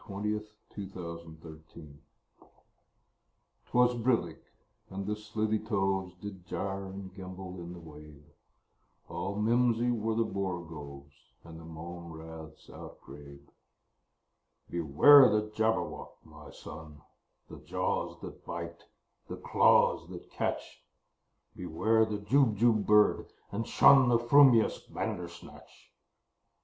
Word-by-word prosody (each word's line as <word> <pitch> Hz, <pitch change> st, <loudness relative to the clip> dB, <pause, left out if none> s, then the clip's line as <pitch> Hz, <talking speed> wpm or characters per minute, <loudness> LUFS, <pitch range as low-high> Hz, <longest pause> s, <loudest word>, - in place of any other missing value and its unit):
Lewis 105 Hz, +2 st, -3 dB, 0.3 s
Carroll 85 Hz, -5 st, -8 dB
Jabberwocky 80 Hz, -1 st, -13 dB, 1.7 s
'TWAS 125 Hz, 0 st, +3 dB
brillig, 110 Hz, -10 st, 0 dB, 0.5 s
and 95 Hz, +1 st, -6 dB
the 105 Hz, +1 st, -2 dB
slithy 105 Hz, 0 st, -2 dB
toves 95 Hz, -4 st, -1 dB
Did 95 Hz, -1 st, -9 dB
gyre 95 Hz, +2 st, -4 dB
and 95 Hz, 0 st, -9 dB
gimble 95 Hz, -1 st, -9 dB
in 85 Hz, 0 st, -8 dB
the 90 Hz, -, -10 dB
wabe: 75 Hz, -2 st, -14 dB, 0.9 s
All 100 Hz, +1 st, -4 dB
mimsy 120 Hz, +2 st, +2 dB
were 110 Hz, -1 st, -1 dB
the 115 Hz, 0 st, +1 dB
borogoves, 80 Hz, -8 st, -6 dB, 0.3 s
And 80 Hz, -1 st, -11 dB
the 80 Hz, -, -12 dB
mome 85 Hz, +1 st, -9 dB
raths 80 Hz, 0 st, -11 dB
outgrabe. 70 Hz, 0 st, -13 dB, 1.2 s
"Beware 85 Hz, -, +7 dB
the 105 Hz, 0 st, 0 dB
Jabberwock, 110 Hz, +1 st, -2 dB
my -, -, -14 dB
son! 75 Hz, -1 st, -11 dB, 0.4 s
The -, -, -11 dB
jaws -, -, -3 dB
that -, -, -10 dB
bite, 85 Hz, 0 st, -7 dB, 0.4 s
the -, -, -7 dB
claws -, -, +3 dB
that -, -, -11 dB
catch! -, -, -4 dB, 0.7 s
Beware 110 Hz, +7 st, +1 dB
the 105 Hz, -1 st, -3 dB
Jubjub 110 Hz, -1 st, +2 dB
bird, 105 Hz, 0 st, +4 dB, 0.2 s
and 115 Hz, +3 st, -3 dB
shun 135 Hz, -3 st, +6 dB
The 120 Hz, -, +4 dB
frumious 120 Hz, -1 st, +5 dB
Bandersnatch!" 85 Hz, -1 st, -8 dB
95 Hz, 110 wpm, -30 LUFS, 85-110 Hz, 1.7 s, Beware